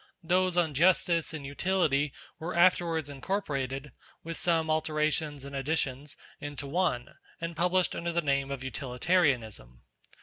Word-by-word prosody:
Those 180 +1 +2
on 165 -4 +2
Justice 170 +1 +3
and 155 -3 -6
Utility 145 -2 +1 0.3
were 170 +3 -4
afterwards 170 -3 +3
incorporated, 140 -3 -3 0.3
with 165 +1 -5
some 165 -2 +2
alterations 155 -2 0
and 140 0 -7
additions, 135 0 -2 0.2
into 145 -1 -5
one, 140 -5 -1 0.2
and 165 0 -4
published 180 +2 +2
under 170 0 -2
the 170 0 0
name 140 -1 +1
of 135 -2 -4
Utilitarianism. 125 - 0
155 Hz, 130 wpm, -29 LUFS, 140-170 Hz, 0.3 s, Justice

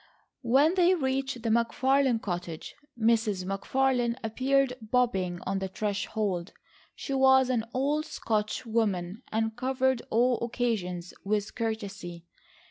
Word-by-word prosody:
When 275 +6 +4
they 365 0 +4
reached 265 -4 -2
the 230 - 0
McFarlane 245 +2 +2
cottage, 175 -4 -5 0.3
Mrs. 220 -4 +2
McFarlane 240 +5 +1
appeared 265 +4 +1
bobbing 210 -7 0
on 195 +1 -1
the 190 - -2
threshold. 200 -2 -2 0.4
She 275 - -5
was 265 -1 +5
an 230 -3 0
old 290 +5 0
Scotch 215 +1 -2
woman 210 -3 -1
and 225 0 0
covered 260 0 +1
all 240 +2 +2
occasions 210 -8 -2
with 205 0 -1
courtesy. 200 -7 -4
230 Hz, 120 wpm, -28 LUFS, 200-260 Hz, 0.4 s, was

